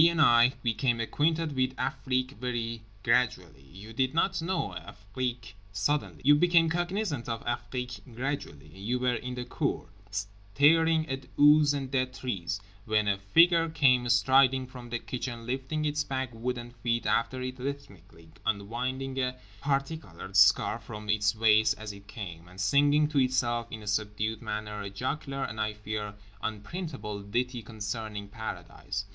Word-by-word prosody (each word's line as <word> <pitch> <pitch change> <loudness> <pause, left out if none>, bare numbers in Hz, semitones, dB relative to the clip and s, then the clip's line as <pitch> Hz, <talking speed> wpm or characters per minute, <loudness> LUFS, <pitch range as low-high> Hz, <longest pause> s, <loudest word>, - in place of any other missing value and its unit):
and 170 -1 -1
I, 120 -3 +6
became 120 +1 +1
acquainted 155 +5 0
with 130 0 +1
Afrique 130 -2 -1
very 115 -2 -2 0.2
gradually. 90 - +1
You 95 +11 -12
did 130 +5 0
not 190 +1 +2
know 165 - -1
Afrique 115 +4 -5 0.2
suddenly. 105 +9 -1
You 145 - +8
became 165 +1 +4
cognisant 175 - -1
of 115 -1 -3
Afrique 125 -1 -3
gradually. 125 - -4
You 100 +9 -2
were 125 0 +1
in 125 +1 -4
the 125 -1 -4
cour, - - -2 0.2
staring 125 +12 +2
at 135 -1 -5
ooze 145 0 +7
and 135 -2 -4
dead 130 -1 0
trees, 95 -9 -3 0.3
when 105 -1 +2
a 100 -1 +1
figure 165 - +5
came 130 -6 +3
striding 130 +2 +4
from 125 -1 -10
the 120 - -1
kitchen 120 -1 -5
lifting 135 +5 -2
its 150 0 0
big 130 -3 -3
wooden 120 +1 -4
feet 120 0 0
after 130 +3 +1
it 130 0 -5
rhythmically, 100 - -7
unwinding 130 +6 -2
a 125 -1 0 0.3
particoloured 135 - -3
scarf 105 +3 +5
from 105 -1 -8
its 105 +1 +2
waist 110 0 +4
as 110 -1 -6
it 100 0 -14
came, 90 -7 -8
and 90 +1 -14
singing 145 +9 +4
to 150 -2 +1
itself 120 -2 +1
in 110 -2 -7
a - - -11
subdued 105 +1 -1
manner 105 0 -4
a 100 - -5
jocular, 135 +6 -3
and 110 0 -3
I 110 0 0
fear, 105 -1 -5 0.3
unprintable 110 - -5
ditty 120 +4 -2
concerning 105 -1 -5
Paradise. 100 -2 -5
120 Hz, 150 wpm, -29 LUFS, 105-135 Hz, 0.3 s, You